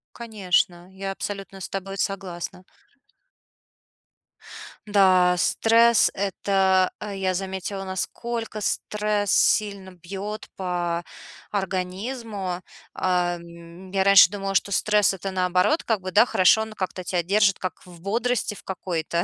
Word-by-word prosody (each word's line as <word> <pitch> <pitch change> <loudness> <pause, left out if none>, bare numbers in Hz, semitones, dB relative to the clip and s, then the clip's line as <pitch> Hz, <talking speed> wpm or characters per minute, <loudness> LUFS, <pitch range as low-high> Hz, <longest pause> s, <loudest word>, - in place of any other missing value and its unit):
Конечно, 185 -5 -1
я 195 0 -4
абсолютно 195 0 -6
с - - -6
тобой 195 0 -5
согласна. 185 -3 -4 2.2
Да, 185 -3 +4
стресс- 230 +4 +4
это 190 -1 +1
Я 195 -2 -2
заметила, 190 +1 -4
насколько 215 +4 -4
стресс 210 -1 -1
сильно 200 -3 +2
бьет 195 +4 -7
по 175 -2 -2 0.5
организму. 195 0 -3 0.3
А, 180 -1 0
м, 170 +2 -12
я 195 0 +2
раньше 195 -2 +8
думала, 195 -1 -4
что 200 - +1
стресс- 210 +1 +3
это, 195 +1 -5
наоборот, 185 - +1
как 225 -3 0
бы, 185 - -5
да, 210 +5 +6
хорошо, 190 -1 +4
он 220 0 -8
как-то 185 -2 -4
тебя 180 0 0
держит 200 +1 +3
как 185 - -5
в 175 -2 -14
бодрости 230 +2 -1
в - - -14
какой-то. 170 -2 -2
195 Hz, 120 wpm, -24 LUFS, 180-205 Hz, 2.2 s, раньше